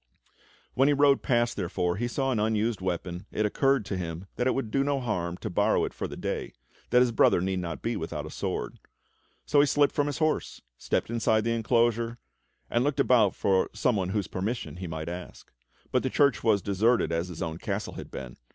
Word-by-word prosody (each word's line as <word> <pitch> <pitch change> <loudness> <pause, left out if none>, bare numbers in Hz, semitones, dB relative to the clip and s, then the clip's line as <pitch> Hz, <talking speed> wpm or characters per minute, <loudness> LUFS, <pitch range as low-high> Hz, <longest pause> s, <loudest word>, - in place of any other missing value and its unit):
When 135 +2 +3
he 145 - +4
rode 140 -1 +4
past, 120 -3 +1
therefore, 90 -1 -1
and 120 +3 -1
saw 135 +1 0
an 115 - 0
unused 110 0 0
weapon 90 -1 -3
it 110 - 0
occurred 135 +2 +2
to 100 -4 -3
him 85 0 -5
that 125 - 0
it 130 - +2
would 125 -5 -3
do 135 +2 +2
no 140 -1 0
harm 90 -8 -2
to - - -5
borrow - - +2
it - - -6
for - - -4
the - - -8
day, - - -3 0.4
that 125 +1 +5
his 125 -1 +3
brother 110 - +4
need 95 +1 -1
not 85 -3 -5
be 115 0 -1
without 80 -5 -4
a - - -8
sword. - - -4 0.7
So 145 - +3
he 145 - +5
slipped 145 +1 +3
from 145 0 +1
his 145 - -3
horse, 155 -1 -1 0.2
stepped 85 - -2
inside 110 -2 +2
the 115 - 0
enclosure, 115 0 +1 0.5
and 120 - +1
looked 145 0 0
about 120 -7 +4
for 95 -1 +2
some 110 +3 +1
one 95 -3 -1
whose 100 0 -1
permission 100 0 -4
he 90 0 -5
might 80 -1 -5
ask. 90 +1 -8 0.4
But - - +2
the - - -1
church 140 -1 +2
was 105 -3 +3
as - - -26
deserted 100 -1 +2
as 85 +1 -1
his 90 -3 -5
own 80 0 -4
castle - - -3
had - - -8
been. 65 -2 -8
110 Hz, 220 wpm, -28 LUFS, 90-125 Hz, 0.7 s, that